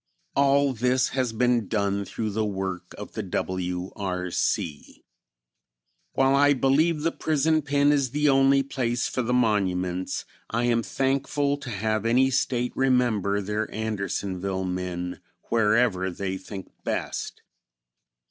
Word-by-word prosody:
All 140 0 +3
this 125 +2 +1
has 130 -3 -1
been 120 -1 +1
done 100 -2 0
through 110 +1 -3
the 110 +2 0
work 95 -3 -4
of 105 - -8
the 110 - -3
W. 90 -1 -3
R. 90 -3 -3
C. 75 -3 -2 1.1
While 135 0 +3
I 145 +1 +5
believe 150 +5 +2
the 165 +2 +1
prison 155 0 +1
pen 145 0 +3
is 140 -3 +2
the 150 +3 +1
only 135 0 +5
place 125 -3 -1
for 130 - -2
the 120 0 -2
monuments, 95 -6 0 0.2
I 115 +2 0
am 120 -1 +2
thankful 135 +5 0
to 140 - -8
have 110 0 -1
any 130 +3 +4
State 125 -1 0
remember 120 -7 +2
their 105 +2 -2
Andersonville 100 -3 -2
men 90 -1 -4 0.3
wherever 105 -4 +3
they 95 +1 -3
think 95 +1 -8
best. - - -3
115 Hz, 135 wpm, -26 LUFS, 95-135 Hz, 1.1 s, I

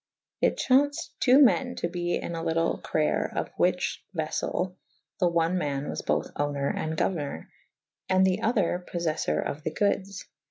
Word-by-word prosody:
It - - +2
chau«ced 285 +3 +2
.ii. 250 - +7
men 245 - +5
to - - -2
be 175 0 -2
in 170 - -4
a 165 - -3
lytle 165 0 0
crayer/of 155 -1 0
the - - -21
whiche - - +1
veffell 180 0 -1 0.5
the 180 - +4
one 170 +1 +1
man 145 -3 -2
was - - -4
both - - -1
owner 145 -1 -1
and 160 0 -3
gouernour 145 - -2 0.3
/ - - -49
and 185 0 +4
the 190 +2 +1
other 200 -6 +1
poffef 170 -2 -1
four 75 - +1
of 145 - -4
the 160 - -2
goodes. 200 +1 -1
175 Hz, 170 wpm, -27 LUFS, 155-190 Hz, 0.5 s, ii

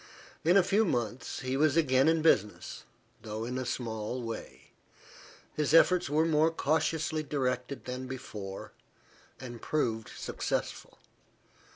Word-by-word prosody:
In 175 +4 +5
a 195 - +6
few 205 +4 +3
months, 120 - -2
he 130 0 -2
was 150 +2 +3
again 135 -3 +4
in 160 -1 +3
business, 105 -10 +1 0.4
though 110 0 -5
in 125 +2 -3
a 130 - -3
small 115 0 -3
way. 115 -1 -7 0.8
His 150 +1 +1
efforts 180 0 +5
were 155 +2 +3
more 160 0 +4
cautiously 160 0 0
directed 130 -2 -2
than 130 +1 -5
before, 105 -7 -7 0.7
and 120 -3 -8
proved 115 -8 -1
successful. - - -3
130 Hz, 130 wpm, -30 LUFS, 120-155 Hz, 0.8 s, a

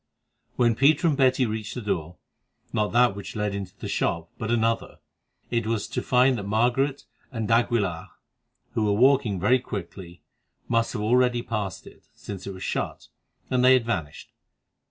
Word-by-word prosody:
When 120 -1 +3
Peter 145 +7 +3
and 155 - +2
Betty 130 -1 +3
reached 110 0 -4
the 125 - -4
door, 90 -4 -3 0.6
not 105 -1 0
that 120 -3 +4
which 100 +2 -8
led 105 -1 -1
into 100 -1 -6
the - - -6
shop, 85 0 -1
but 110 - -3
another, 115 -1 0 0.5
it 115 -2 0
was 115 -2 -1
to - - -2
find 125 0 +3
that 100 - -6
Margaret 125 +6 +1 0.3
and 115 -4 -3
d'Aguilar, 115 -7 +1 0.6
who 110 - 0
were 105 - +2
walking 130 -7 +3
very 125 +8 +3
quickly, 90 -5 -8 0.4
must 115 -1 +1
have 105 -4 -3
already 120 +1 +2
passed 105 -6 -4
it, - - -16
since 100 -2 -8
it - - -4
was 95 - -8
shut, - - -3 0.4
and 125 -1 +2
they 130 +1 +7
had 125 -3 +3
vanished. 85 -11 -4
115 Hz, 170 wpm, -25 LUFS, 100-125 Hz, 0.6 s, they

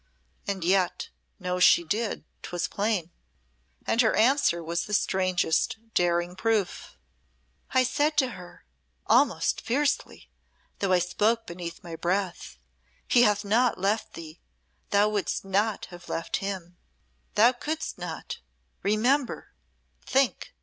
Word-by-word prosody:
And 195 -3 -2
yet, 185 0 +1 0.3
know 180 -2 -3
she 175 -1 +6
did, 210 +6 -2 0.2
'twas 175 -1 -3
plain. 200 -5 -1 0.7
And 230 - +3
her 220 - +3
answer 225 -8 +3
was 170 +1 -2
the 210 - 0
strangest, 185 +3 +1 0.2
daring 175 0 +1
proof. 210 -1 -1 0.7
"I 260 0 +3
said 290 +4 0
to 260 -3 +3
her 180 -6 -12 0.4
almost - - +3
fiercely, 290 +4 -1 0.5
though 195 -2 0
I 185 - +6
spoke 215 +6 +1
beneath 170 -1 -7
my 170 -2 -7
breath, 180 +2 -2 0.5
'He 240 - +5
hath 210 -2 +3
not 235 +3 +2
left 200 +4 -1
thee: 160 0 -10 0.5
Thou 205 +1 +4
wouldst 205 -2 -2
not 200 +3 0
have 175 0 -12
left 165 - -2
him. 185 -3 -5 0.6
Thou 230 +4 +6
couldst 305 +5 -4
not. - - -6 0.4
Remember! 245 +7 0 0.5
Think! 270 -1 0
200 Hz, 125 wpm, -27 LUFS, 175-230 Hz, 0.7 s, she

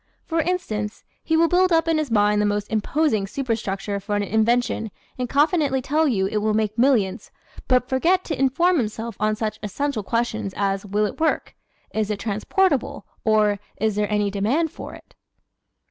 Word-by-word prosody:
For 325 0 0
instance, 220 -12 -3 0.2
he 320 0 +1
will 335 +1 +5
build 365 +1 +3
up 325 0 +3
in 325 -1 +2
his 305 -3 -2
mind 210 -1 +3
the - - +2
most 205 0 -2
imposing 220 -1 +1
superstructure 205 -5 -3
for 205 +1 -3
an 205 - 0
invention 225 +2 +1 0.3
and 250 -1 -2
confidently 290 -2 +2
tell 305 +5 +1
you 200 -8 +1
"it 200 - -1
will 210 0 +1
make 215 -1 0
millions," 230 -5 +1 0.4
but 250 -1 +3
forget 345 +8 +2
to 315 - -4
inform 340 +7 +3
himself 225 -1 -3
on 215 0 +1
such 215 0 -3
essential 245 +4 -2
questions 220 -2 -2
as 195 0 -1
"will 210 +2 +1
it 205 - -5
work?" 320 0 0 0.4
"Is 215 -1 -1
it 210 - -1
transportable?" 255 - 0 0.2
or 210 -2 +3 0.2
"Is 220 -2 +1
there 210 0 -1
any 210 -1 +1
demand 250 +12 0
for - - -9
it?" - - -17
220 Hz, 175 wpm, -23 LUFS, 210-290 Hz, 0.4 s, will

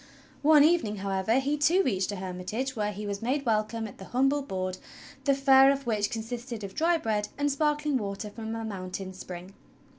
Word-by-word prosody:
One 300 0 +7
evening, 305 -10 +2
how^ever, 195 +4 +1
he, 285 +2 0
too, 330 +6 +4
reached 195 - 0
a - - -4
hermitage 190 +8 -4
where 210 -2 -1
he 210 +1 -6
was 200 -1 -4
made 270 +4 -1
welcome 225 0 0
at 200 - -13
the 190 - -8
humble 270 +5 +2
board, 185 -7 -4 0.5
the 280 -1 +4
fare 270 0 +6
of 275 0 -2
which 210 -3 0
consisted 230 0 -5
of 195 -1 -6
dry 335 - +2
bread 215 -7 -1
and 290 0 +1
sparkling 295 0 +1
water 205 0 -5
from 220 +1 -5
a 225 0 -4
mountain 190 -2 -5
spring. 185 0 -9
225 Hz, 190 wpm, -28 LUFS, 200-275 Hz, 0.5 s, One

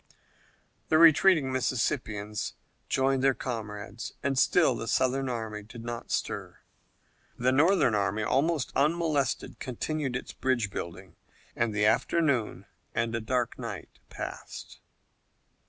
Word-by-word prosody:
The 155 - +5
retreating 160 -2 +6
Mississippians 110 -5 -1 0.3
rejoined 135 0 +2
their 135 -1 +4
comrades, 110 -2 -5
and 140 -1 +1
still 145 +2 +4
the 115 -1 -5
Southern 130 +2 +1
army 110 -3 -4
did 115 +2 -11
not 120 0 -5
stir. - - -3 0.8
The 125 +1 +2
Northern 150 - +4
army, 105 +1 0
almost 145 +5 +1
unmolested, 150 -2 0
continued 135 +1 -3
its 125 - -5
bridge 120 -6 0
building, 90 0 -7 0.4
and 120 -1 +1
the 105 0 +1
afternoon 140 -2 +1 0.3
and 115 0 0
a 115 - -1
dark 125 +2 -1
night 115 -6 -7
passed. - - -8
125 Hz, 120 wpm, -28 LUFS, 110-140 Hz, 0.8 s, retreating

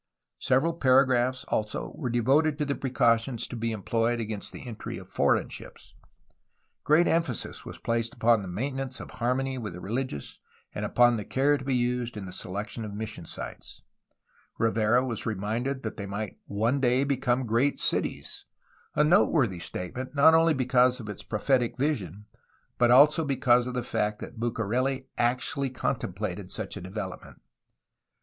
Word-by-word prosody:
Several 135 +6 +2
paragraphs, 130 -3 +3
also, 105 -1 -2
were 130 -6 -4
devoted 140 +6 +2
to 150 - 0
the 140 - 0
precautions 120 -2 +1
to - - -7
be 115 0 -2
employed 115 +3 0
against 110 -2 -4
the - - -10
entry 115 -3 -6
of - - -10
foreign - - +2
ships. - - -11 0.9
Great 160 +4 +4
emphasis 165 -8 -1
was - - -8
placed 115 0 -2
upon 115 -5 +2
maintenance 130 +5 -3
of - - -9
harmony 130 +1 -1
with 105 -6 -5
the 90 - -8
religious 115 - -4 0.3
and - - -3
upon 120 -1 +4
the 105 - -4
care 140 +7 +2
to 140 - -5
be 135 -1 0
used 120 -1 -1
in 100 - -5
the 90 - -8
selection 105 +5 -5
of 105 -2 -6
mission 105 -5 -6
sites; - - -9 0.7
Rivera 115 +2 +2
was 115 -3 -3
reminded 115 +6 -2
that 110 - -5
they 100 -2 -5
might 100 +1 -5
one 115 +7 0
day 125 0 +3
become 130 -2 0
great 120 +5 +1
cities, - - -2 0.3
— - - -33
a 150 - +4
noteworthy 150 - +3
statement 125 - -5
not 145 +3 +7
only 165 -1 +5
be 130 -2 -1
cause 125 0 +4
of 110 -3 -7
its 105 - -7
prophetic 120 +2 0
vision 105 - -2 0.5
but 120 -1 +5
also 150 +6 +6
because 125 -3 +3
of 125 - -4
the 125 - -1
fact 105 -2 -1
that 120 - -9
Bucareli 125 +4 -1
actually 125 +3 0
contemplated 100 -6 -3
such 105 -3 -4
a 100 - -6
development. 95 0 -7
120 Hz, 165 wpm, -27 LUFS, 110-135 Hz, 0.9 s, not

